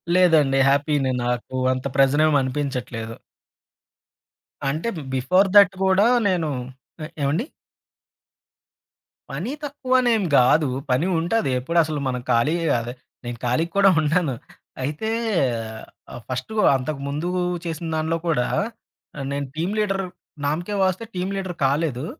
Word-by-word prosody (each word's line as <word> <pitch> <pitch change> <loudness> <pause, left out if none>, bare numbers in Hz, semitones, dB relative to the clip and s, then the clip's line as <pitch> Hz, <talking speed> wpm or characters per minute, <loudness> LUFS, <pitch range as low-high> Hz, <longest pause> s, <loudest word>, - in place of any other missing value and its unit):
లేదండి. 160 -7 +4
హ్యాపీనే 140 -1 +1
నాకు. 125 +1 -3 0.2
అంత 130 +1 -5
ప్రెజరేమనిపించట్లేదు. 135 -5 +1 1.5
అంటే, 155 +11 -2 0.3
బిఫోర్ 185 +10 +3
దట్ 200 -1 +7
గూడా 190 +3 +4 0.2
నేనూ 170 -5 0 0.5
ఆహ్, 155 - -7
ఏవండీ? 155 - 0 1.8
పనీ 260 - -4
తక్కువనేం 255 -6 +1
గాదు, 140 +5 +5 0.2
పని 130 +8 +2
ఉంటది. 175 +1 0
ఎప్పుడసలు 155 +2 +1
మనం 125 -1 -2
ఖాళీయే 150 +9 +2
గాదె. 120 0 -2 0.3
నేను 120 -1 -5
ఖాళీగ 125 +8 +1
కూడా 200 0 +6
ఉండను. 155 -2 +1 0.5
అయితే, 150 +11 -3 1.0
ఆహ్, 120 - -8
ఫస్టు 130 +10 -4 0.2
అంతకముందూ 140 +4 -3 0.4
చేసిన 165 0 -4
దానిలో 160 +1 0
కూడా 150 -7 +1 0.7
ఆహ్, 140 - -4
నేను 140 0 -3
టీమ్ 170 +6 -2
లీడర్, 195 -2 0 0.4
నామ్ 155 +4 0
కే 205 - -2
వాస్తే 190 +4 0
టీమ్ 185 +2 -2
లీడర్ 190 -2 -4
కాలేదు, 140 -1 0
155 Hz, 115 wpm, -23 LUFS, 135-185 Hz, 1.8 s, దట్